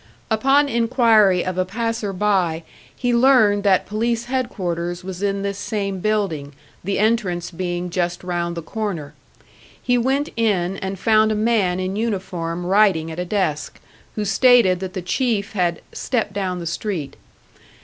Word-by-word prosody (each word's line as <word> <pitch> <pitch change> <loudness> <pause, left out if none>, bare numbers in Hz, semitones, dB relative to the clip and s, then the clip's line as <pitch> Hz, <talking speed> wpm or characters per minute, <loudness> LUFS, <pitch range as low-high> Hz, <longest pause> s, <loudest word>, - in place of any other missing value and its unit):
Upon 270 +6 +3
inquiry 230 -6 +3
of 185 0 -2
a - - +3
passer 225 +1 -3
by, 185 -4 0 0.3
he 245 -1 0
learned 235 -5 +4
that 190 -2 +3
police 230 +3 -1
headquarters 180 -9 -3
was 185 0 -7
in 200 -1 -1
this 200 0 -3
same 200 -3 -3
building, 180 -9 -1 0.3
the 195 +2 -1
entrance 200 -6 0
being 175 0 -3
just 175 0 -2
round 170 -1 -2
the 170 - -4
corner. 170 -7 -4 0.7
He 245 -1 +1
went 270 +4 0
in, 195 -5 0
and 190 0 -4
found 215 +2 +3
a - - 0
man 210 -5 +1
in 185 +1 -2
uniform 180 -6 -3
writing 185 -4 +3
at 160 - -6
a 180 - -2
desk, 170 -7 -2 0.4
who 210 - -2
stated 200 -2 +4
that 185 -1 -5
the 185 - -4
Chief 220 0 -1
had 175 -5 -1
"stepped 225 -5 -2
down 190 -3 -2
the 170 - -6
street." 170 -4 -4
195 Hz, 155 wpm, -21 LUFS, 180-220 Hz, 0.7 s, learned